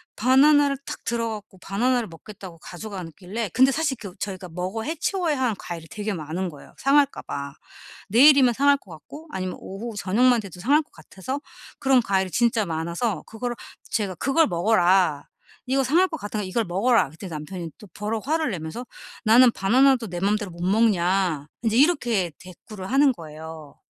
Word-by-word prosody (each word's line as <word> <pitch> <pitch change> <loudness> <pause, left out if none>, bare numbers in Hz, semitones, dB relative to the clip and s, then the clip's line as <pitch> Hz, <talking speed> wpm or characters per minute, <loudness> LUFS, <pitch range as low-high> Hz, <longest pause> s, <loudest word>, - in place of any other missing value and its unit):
바나나를 280 +4 +4
탁 - - -7
들어 230 -1 -1
갖고 210 -3 -8
바나나를 235 +5 0
먹겠다고 185 0 -11
가져가길래 190 +2 -6
근데 260 +1 +5
사실 300 -2 0
그 200 -4 -8
저희가 185 -2 -5
먹어 185 +6 -4
해치워야 325 - -1
하는 245 -5 +1
과일이 165 -2 -7
되게 215 +1 -4
많은 175 +2 -4
거예요, 145 -3 -14
상할까 280 0 +2
봐. 140 0 -6 0.6
내일이면 260 +1 +6
상할 280 +3 +4
것 195 - -18
같고 285 - -12
아니면 185 -1 -4
오후, 215 +4 -7
저녁만 230 +6 +3
돼도 185 -3 -11
상할 285 - +3
것 - - -19
같아서 190 - -6 0.4
그런 265 -2 +4
과일이 190 -4 0
진짜 230 -3 +2
많아서 170 +7 -2
그거를 240 +2 -4 0.4
제가 200 -5 -1
"그걸 300 - +2
먹어라. 175 -4 +2 0.4
이거 270 +1 +2
상할 335 +9 +3
것 320 - -4
같으니까 210 -3 -4
이걸 220 +4 -1
먹어라." 205 +4 +2
그랬더니 170 +5 -10
남편이 160 +2 -6
또 210 - -14
버럭 215 +4 -4
화를 315 -4 +1
내면서 170 +7 -6 0.4
"나는 240 +2 +6
바나나도 250 +4 +3
내 175 - -4
맘대로 205 +1 0
못 170 +1 -11
먹냐?" 185 -7 +2
인제 225 0 +1
이렇게 240 - +2
대꾸를 185 +2 -10
하는 275 +1 +5
거예요. 160 -4 -10
210 Hz, 380 characters per minute, -24 LUFS, 180-255 Hz, 0.6 s, 내일이면